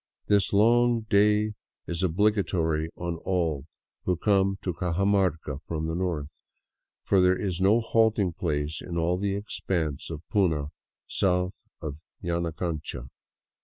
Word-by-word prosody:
This 100 Hz, -1 st, +2 dB
long 120 Hz, +3 st, +4 dB
day 105 Hz, +1 st, +4 dB, 0.3 s
is 85 Hz, 0 st, -3 dB
obligatory 90 Hz, -4 st, +1 dB
on 85 Hz, -1 st, -3 dB
all 80 Hz, -6 st, -1 dB, 0.4 s
who 90 Hz, -2 st, +1 dB
come 95 Hz, 0 st, +2 dB
to 90 Hz, -, -1 dB
Cajamarca 90 Hz, -4 st, 0 dB
from 80 Hz, -1 st, -2 dB
the 80 Hz, -, -2 dB
north, 85 Hz, -4 st, -1 dB, 0.8 s
for 95 Hz, -2 st, +3 dB
there 90 Hz, 0 st, +4 dB
is 95 Hz, -3 st, -2 dB
no 100 Hz, +5 st, +5 dB
halting 110 Hz, -5 st, +2 dB
place 75 Hz, -2 st, -2 dB
in 85 Hz, -1 st, -5 dB
all 85 Hz, +2 st, +2 dB
the 100 Hz, 0 st, 0 dB
expanse 85 Hz, -7 st, -2 dB
of 80 Hz, 0 st, -7 dB
puna 80 Hz, -8 st, +1 dB, 0.4 s
south 90 Hz, 0 st, 0 dB, 0.2 s
of 75 Hz, -2 st, -4 dB, 0.3 s
Yanacancha. 85 Hz, -6 st, -3 dB
90 Hz, 130 wpm, -27 LUFS, 80-100 Hz, 0.8 s, no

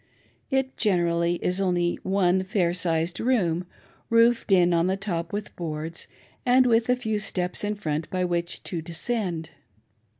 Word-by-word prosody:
It 265 Hz, -1 st, 0 dB
generally 170 Hz, -4 st, +2 dB
is 180 Hz, +2 st, +1 dB
only 175 Hz, -2 st, +1 dB
one 190 Hz, -1 st, +2 dB
fair 185 Hz, -3 st, +1 dB
sized 165 Hz, -1 st, -1 dB
room, 180 Hz, -9 st, +1 dB, 0.4 s
roofed 230 Hz, -1 st, +3 dB
in 180 Hz, -2 st, +5 dB
on 170 Hz, +1 st, +2 dB
the 190 Hz, +1 st, 0 dB
top 175 Hz, -4 st, -3 dB
with 205 Hz, 0 st, -5 dB
boards, 160 Hz, 0 st, -5 dB, 0.4 s
and 255 Hz, +1 st, +5 dB
with 230 Hz, -1 st, +3 dB
a 250 Hz, -, +5 dB
few 220 Hz, -4 st, -2 dB
steps 180 Hz, -3 st, -1 dB
in 210 Hz, 0 st, -1 dB
front 155 Hz, -6 st, -3 dB
by 185 Hz, -1 st, 0 dB
which 170 Hz, -1 st, -2 dB
to 170 Hz, -3 st, -4 dB
descend. 170 Hz, -1 st, -3 dB
180 Hz, 155 wpm, -25 LUFS, 170-210 Hz, 0.4 s, in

